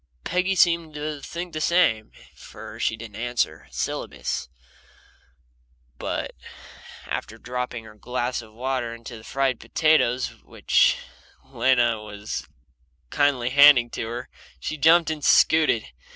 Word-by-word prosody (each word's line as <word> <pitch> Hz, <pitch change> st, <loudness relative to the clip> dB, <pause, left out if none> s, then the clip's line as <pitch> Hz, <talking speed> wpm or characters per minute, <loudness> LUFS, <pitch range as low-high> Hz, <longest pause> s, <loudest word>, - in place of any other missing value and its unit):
Peggy 180 Hz, +2 st, 0 dB
seemed 170 Hz, -3 st, +2 dB
to 150 Hz, -1 st, -4 dB
think 170 Hz, +3 st, -6 dB
the 155 Hz, -, -3 dB
same, 155 Hz, -12 st, +2 dB, 0.2 s
for -, -, -11 dB
she 110 Hz, -, 0 dB
didn't 110 Hz, -3 st, -10 dB
answer 120 Hz, -9 st, -2 dB
a -, -, -28 dB
syllabus, -, -, -3 dB, 1.5 s
but -, -, -3 dB, 0.7 s
after 110 Hz, -, -5 dB
dropping 125 Hz, -1 st, -5 dB
her 110 Hz, -1 st, -13 dB
glass 125 Hz, +3 st, -3 dB
of 110 Hz, -1 st, -15 dB
water 120 Hz, 0 st, -3 dB
into 115 Hz, +1 st, -10 dB
the 110 Hz, -, -12 dB
fried 135 Hz, 0 st, -1 dB
potatoes 140 Hz, -6 st, +2 dB
which -, -, +2 dB, 0.5 s
Lena 120 Hz, -4 st, +2 dB
was 105 Hz, 0 st, -6 dB, 0.6 s
kindly 130 Hz, -4 st, +1 dB
handing 140 Hz, -4 st, +7 dB
to 110 Hz, -, -4 dB
her, 120 Hz, +2 st, -6 dB, 0.3 s
she -, -, -4 dB
jumped 160 Hz, +2 st, +5 dB
and 150 Hz, -2 st, -5 dB
scooted. 155 Hz, -8 st, +4 dB
125 Hz, 125 wpm, -24 LUFS, 115-155 Hz, 1.5 s, handing